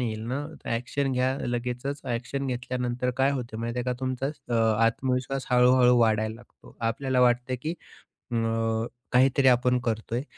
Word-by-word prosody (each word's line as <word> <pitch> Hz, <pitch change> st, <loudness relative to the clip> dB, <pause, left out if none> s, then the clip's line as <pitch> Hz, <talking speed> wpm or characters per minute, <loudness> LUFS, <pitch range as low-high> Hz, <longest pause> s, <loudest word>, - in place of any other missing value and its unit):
येईल 110 Hz, -3 st, -2 dB
ना, 145 Hz, +2 st, -2 dB, 0.3 s
एक्शन 135 Hz, +3 st, -2 dB
घ्या 130 Hz, +1 st, +1 dB
लगेचच. 125 Hz, +4 st, -3 dB
एक्शन 135 Hz, +3 st, -3 dB
घेतल्यानंतर 125 Hz, 0 st, -2 dB
काय 135 Hz, +1 st, +4 dB
होत 125 Hz, -4 st, -4 dB
माहिती 115 Hz, +2 st, -3 dB
आहे 125 Hz, -, -1 dB
का? 125 Hz, -, 0 dB
तुमचा 130 Hz, 0 st, -2 dB
अ, 140 Hz, -4 st, -5 dB, 0.3 s
आत्मविश्वास 130 Hz, +3 st, -1 dB
हळू-हळू 125 Hz, 0 st, +5 dB
वाढायला 110 Hz, -1 st, +2 dB
लागतो. 120 Hz, +1 st, -18 dB
आपल्याला 125 Hz, +3 st, 0 dB
वाटत 125 Hz, +1 st, +3 dB
की 160 Hz, +3 st, -2 dB, 0.6 s
अ, -, -, -1 dB, 0.8 s
काहीतरी 130 Hz, +2 st, +4 dB
आपण 125 Hz, 0 st, +4 dB
करतो 110 Hz, 0 st, -2 dB
आहे 125 Hz, -, -1 dB
125 Hz, 150 wpm, -27 LUFS, 120-130 Hz, 0.8 s, हळू-हळू